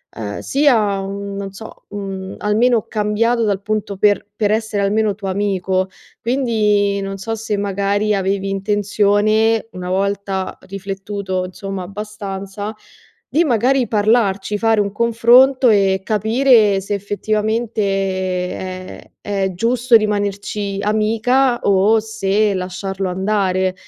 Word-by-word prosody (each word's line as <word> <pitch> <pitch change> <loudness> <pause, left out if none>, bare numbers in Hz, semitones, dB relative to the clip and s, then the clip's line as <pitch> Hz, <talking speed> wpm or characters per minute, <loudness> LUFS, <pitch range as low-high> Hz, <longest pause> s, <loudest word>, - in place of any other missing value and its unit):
ehm, 105 -2 -5
sia, 225 -9 +2
mhmm, 200 +1 -5
non 195 -1 -5
so, 220 +3 -11
mhmm, 195 -2 -6
almeno 220 +2 +2
cambiato 225 +2 0
dal 200 -2 0
punto 210 -2 -2
per 205 +1 +2
per 210 -1 +1
essere 220 -2 0
almeno 210 +1 +1
tuo 200 -1 -6
amico. 190 -1 0 0.3
Quindi, 210 -5 +1
non 195 0 -4
so 225 +4 -4
se 220 -1 -3
magari 200 +1 0
avevi 195 0 -1
intenzione, 205 +2 +1
una 180 -1 -6
volta 195 0 -2
riflettuto 195 -1 -4
insomma 195 +1 -6
abbastanza, 205 +1 -6 0.5
di 330 +3 +2
magari 250 -1 +2
parlarci, 210 -2 +1
fare 225 -1 +2
un 200 - -2
confronto 235 +4 +4
e 195 -3 +3
capire 220 -1 +3
se 200 +2 -4
effettivamente 215 +3 -1 0.8
è 185 0 -8
è 195 -2 -1
giusto 235 +4 +2
rimanerci 205 -1 0
amica 230 +5 +2
o 200 +3 +3
se 215 -1 0
lasciarlo 190 +1 -3
andare. 190 -1 0
205 Hz, 120 wpm, -18 LUFS, 195-220 Hz, 0.8 s, confronto